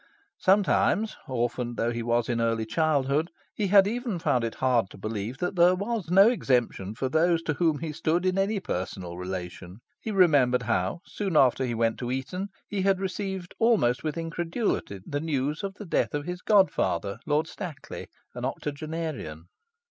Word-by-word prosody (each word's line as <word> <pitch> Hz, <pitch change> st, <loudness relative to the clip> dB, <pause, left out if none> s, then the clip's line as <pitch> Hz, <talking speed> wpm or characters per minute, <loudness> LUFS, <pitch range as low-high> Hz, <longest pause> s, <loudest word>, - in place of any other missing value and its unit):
Sometimes 205 Hz, +2 st, +3 dB
(orphaned 120 Hz, -1 st, -2 dB
though 115 Hz, +2 st, +1 dB
he 120 Hz, 0 st, -3 dB
was 120 Hz, 0 st, +1 dB
in 120 Hz, -2 st, 0 dB
early 115 Hz, -1 st, 0 dB
childhood) 150 Hz, +4 st, +1 dB, 0.2 s
he 210 Hz, -, -1 dB
had 195 Hz, 0 st, +7 dB
even 235 Hz, -2 st, -2 dB
found 130 Hz, -8 st, +1 dB
it 115 Hz, -, -3 dB
hard 125 Hz, -6 st, +2 dB
to -, -, -13 dB
believe 110 Hz, +4 st, -4 dB
there 180 Hz, +1 st, +3 dB
was 205 Hz, -2 st, -3 dB
no 195 Hz, +3 st, +7 dB
exemption 120 Hz, -, 0 dB
for 130 Hz, +3 st, -1 dB
those 165 Hz, +3 st, +2 dB
to 150 Hz, -, 0 dB
whom 160 Hz, -1 st, +1 dB
he 155 Hz, +1 st, -4 dB
stood 165 Hz, +3 st, 0 dB
in 185 Hz, 0 st, +2 dB
any 200 Hz, +2 st, +1 dB
personal 90 Hz, -, -4 dB
relation. 90 Hz, 0 st, -6 dB, 0.2 s
He -, -, -5 dB
remembered 145 Hz, -11 st, +4 dB
how, 110 Hz, -, -1 dB
soon 195 Hz, -6 st, -2 dB
after 130 Hz, -1 st, +4 dB
he 120 Hz, -, -2 dB
went 115 Hz, 0 st, 0 dB
to 120 Hz, -, -3 dB
Eton, 135 Hz, +10 st, -3 dB, 0.2 s
he 200 Hz, -2 st, -2 dB
had 195 Hz, 0 st, +2 dB
received 190 Hz, -1 st, -4 dB
almost 215 Hz, -, +3 dB
with 155 Hz, +1 st, -2 dB
incredulity 165 Hz, -, -2 dB
the 145 Hz, -, -2 dB
news 150 Hz, -1 st, -1 dB
of 195 Hz, -1 st, -4 dB
the 205 Hz, -, -9 dB
death 165 Hz, -, 0 dB
of 145 Hz, 0 st, -3 dB
his 180 Hz, +1 st, -5 dB
god 200 Hz, -3 st, +5 dB
father, 100 Hz, +6 st, -1 dB
Lord 150 Hz, +1 st, +2 dB
Stackley, 170 Hz, -3 st, -7 dB, 0.3 s
an -, -, -7 dB
octogenarian.... 145 Hz, -, -4 dB
150 Hz, 175 wpm, -27 LUFS, 120-185 Hz, 0.3 s, had